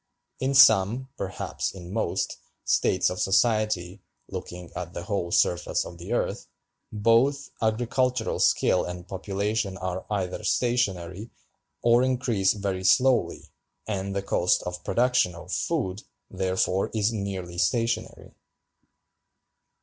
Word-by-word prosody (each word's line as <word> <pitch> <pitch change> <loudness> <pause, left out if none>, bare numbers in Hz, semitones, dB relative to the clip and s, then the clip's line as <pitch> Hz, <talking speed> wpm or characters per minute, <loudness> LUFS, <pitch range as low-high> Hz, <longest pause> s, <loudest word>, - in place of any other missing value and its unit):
In 135 +1 0
some, 120 0 +6
perhaps 95 - -4
in 90 0 -9
most, 115 - -1 0.3
states 90 - +2
of 90 - -5
society 105 -2 +1 0.3
(looking 90 -1 -7
at 90 0 -6
the 85 - -4
whole 100 -3 -2
surface 90 0 +1
of 85 - -10
the 85 - -8
earth), - - -1 0.4
both 115 +7 +2
agricultural 120 +2 0
skill - - +3
and 90 0 -7
population 100 +1 -2
are 95 0 -4
either 95 -1 -2
stationary, 100 -4 0 0.5
or 120 +1 +5
increase 125 -6 +1
very 100 -3 -3
slowly, 120 -3 +2 0.4
and 100 -2 -3
the 100 - -1
cost 90 -2 +1
of 90 0 -6
production 120 -7 +2
of 85 +1 -10
food, 110 - -1 0.3
therefore, 95 0 0
is 110 +1 +1
nearly 95 -4 -4
stationary. 115 +6 -1
100 Hz, 120 wpm, -26 LUFS, 90-115 Hz, 0.5 s, some